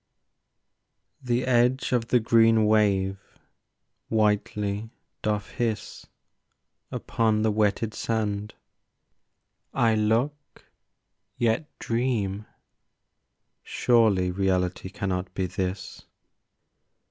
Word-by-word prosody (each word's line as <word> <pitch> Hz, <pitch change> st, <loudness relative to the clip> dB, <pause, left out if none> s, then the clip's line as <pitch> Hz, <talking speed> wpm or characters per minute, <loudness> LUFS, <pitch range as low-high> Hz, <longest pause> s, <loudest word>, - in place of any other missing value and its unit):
The 125 Hz, 0 st, 0 dB
edge 125 Hz, +1 st, +2 dB
of 120 Hz, -2 st, +1 dB
the 125 Hz, -, +3 dB
green 115 Hz, -1 st, +4 dB
wave 100 Hz, -3 st, +2 dB, 0.9 s
whitely 105 Hz, -1 st, 0 dB, 0.3 s
doth 105 Hz, -2 st, -1 dB
hiss 115 Hz, -4 st, -3 dB, 0.8 s
Upon 110 Hz, -2 st, 0 dB
the 110 Hz, -, +2 dB
wetted 105 Hz, +1 st, 0 dB
sand. 105 Hz, -2 st, -2 dB, 1.2 s
I 115 Hz, -2 st, +3 dB
look, 115 Hz, +7 st, -1 dB, 0.7 s
yet 120 Hz, +6 st, 0 dB
dream. 110 Hz, -4 st, -1 dB, 1.1 s
Surely 105 Hz, -7 st, +2 dB
reality 95 Hz, -1 st, -1 dB
cannot 95 Hz, -1 st, -3 dB
be 95 Hz, -, 0 dB
this! 90 Hz, +1 st, -5 dB
110 Hz, 75 wpm, -26 LUFS, 100-115 Hz, 1.2 s, green